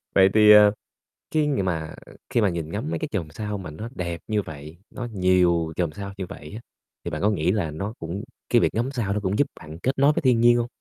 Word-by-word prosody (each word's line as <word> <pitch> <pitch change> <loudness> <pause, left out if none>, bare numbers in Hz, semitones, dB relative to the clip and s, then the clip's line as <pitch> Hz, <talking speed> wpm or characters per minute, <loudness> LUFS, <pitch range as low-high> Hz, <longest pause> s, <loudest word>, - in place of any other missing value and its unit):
Vậy 95 0 +6
thì, 105 -1 +7
ờ, 105 -1 +8 0.6
khi 155 -1 +2
ng 135 -9 0
mà 80 -4 -3 0.4
khi 120 - +2
mà 105 - +3
nhìn 85 -3 -4
ngắm 110 - -3
mấy - - -2
cái 155 - -4
chòm 85 -8 -3
sao 105 +5 -4
mà 90 -5 -7
nó 105 +10 -7
đẹp 85 -4 -4
như 105 -2 +1
vậy, 75 -1 -10
nó 120 -1 -6
nhiều 90 -4 +2
chòm 85 -4 -1
sao 100 -1 -7
như 95 - -4
vậy 100 - -10
á, 110 - -7 0.4
thì - - -3
bạn 75 - -4
có 105 - +4
nghĩ 90 -4 +1
là 95 -7 -1
nó 95 +8 -4
cũng 85 +5 -5 0.3
cái 120 - +4
việc - - +1
ngắm 120 +4 0
sao 115 -7 -1
nó 105 - -1
cũng 100 0 -1
giúp 145 - +4
bạn 80 +1 -10
kết 135 +1 -1
nối 140 +2 +5
với - - -2
thiên 125 -4 +3
nhiên 120 0 +6
hông? 120 -1 0
100 Hz, 260 wpm, -24 LUFS, 85-115 Hz, 0.6 s, ờ